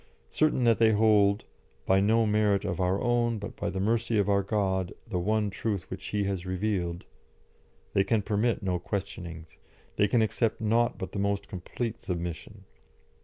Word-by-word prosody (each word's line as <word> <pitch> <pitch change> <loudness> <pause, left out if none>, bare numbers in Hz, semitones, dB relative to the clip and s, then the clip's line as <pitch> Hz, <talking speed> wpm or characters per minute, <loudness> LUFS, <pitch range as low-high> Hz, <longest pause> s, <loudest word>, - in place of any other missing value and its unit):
Certain 155 -4 +2
that 115 -2 +4
they 110 -1 +5
hold, 105 -1 +3 0.4
"by 95 0 +4
no 110 +3 +3
merit 105 -2 +2
of 95 -3 -2
our 90 +2 +1
own, 120 -1 +1
but 100 -1 -7
by 100 - -3
the 95 0 -4
mercy 115 +2 +1
of 100 - +2
our 100 -1 +3
God, 95 -3 -1
the 100 -6 -3
one 105 +2 0
truth 100 -2 -3
which 95 +1 -6
He 105 -1 -1
has 95 -3 -2
revealed," 90 -2 -2 0.9
they 95 - +4
can 105 +1 +1
permit 105 +2 0
no 90 -2 0
questionings, 85 -4 -6 0.4
they 105 - +4
can 110 +2 +3
accept 110 +1 0
nought 115 +2 +1
but 95 - -6
the 100 - -4
most 100 0 -1
complete 115 +5 -5
submission. 85 -3 -5
100 Hz, 170 wpm, -28 LUFS, 95-110 Hz, 0.9 s, they